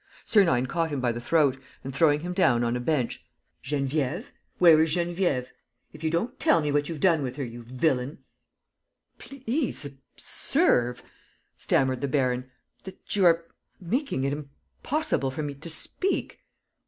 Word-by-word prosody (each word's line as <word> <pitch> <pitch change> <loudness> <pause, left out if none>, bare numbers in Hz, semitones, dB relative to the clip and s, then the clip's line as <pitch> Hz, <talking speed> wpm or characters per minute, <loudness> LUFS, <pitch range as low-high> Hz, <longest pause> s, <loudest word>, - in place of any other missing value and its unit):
Sernine 170 - +3
caught 165 +5 -1
him 145 -3 -3
by 125 -2 +1
the 120 +1 -5
throat 135 0 +2 0.2
and, 135 - -6
throwing 150 0 +3
him 175 +2 -4
down 130 -11 +3
on 120 0 0
a - - -1
bench: 125 -2 -1 0.4
"Geneviève?... 145 - -2 0.3
Where 165 -3 +7
is 160 +1 +2
Geneviève? 170 -7 0 0.4
If - - -12
you 160 - +1
don't 170 +10 -2
tell 165 - +4
me 150 -2 -1
what 145 +1 0
you've 165 -3 -5
done 165 -3 +3
with 130 -2 -4
her, 140 - -3
you 120 -1 -7
villain... 130 +3 -1 0.5
." - - -53
"Please 265 - -3
observe," 125 -2 0 0.5
stammered 130 -2 +1
the 140 - 0
baron, 130 -2 0 0.3
"that 190 - -5
you 195 -2 +3
are 165 0 +3 0.3
making 225 - -2
it 140 +1 0
impossible 150 - -3
for 140 +4 -4
me 145 -1 -4
to 155 +5 -9
speak." 370 - -1
145 Hz, 160 wpm, -26 LUFS, 130-170 Hz, 0.5 s, Where